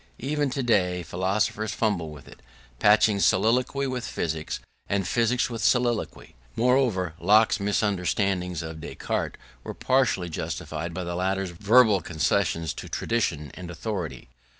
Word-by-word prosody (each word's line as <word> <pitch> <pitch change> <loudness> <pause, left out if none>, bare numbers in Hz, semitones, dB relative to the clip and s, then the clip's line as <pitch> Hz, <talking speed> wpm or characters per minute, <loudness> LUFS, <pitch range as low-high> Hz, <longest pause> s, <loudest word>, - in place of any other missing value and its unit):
Even 145 +2 -1
today 95 -9 +1
philosophers 100 +5 -1
fumble 100 -8 0
with 70 -4 -12
it, - - -14 0.4
patching 105 0 +4
soliloquy 120 +8 +2
with 130 -2 -3
physics 80 -1 -3 0.3
and 100 -2 0
physics 120 +3 +1
with 115 -3 -5
soliloquy. 120 -3 0 0.2
Moreover, 120 -9 +2
Locke's 105 +5 +4
misunderstandings 100 -3 0
of 80 0 -7
Descartes - - -3 0.3
were - - -6
partly 130 -9 +1
justified 80 0 -4
by 90 - -3
the 85 0 -4
latter's 95 +1 -1
verbal 105 +2 +4
concessions 80 -1 0
to - - -8
tradition 80 - -1
and 90 -1 -8
authority. 90 0 -5
100 Hz, 125 wpm, -26 LUFS, 85-115 Hz, 0.4 s, patching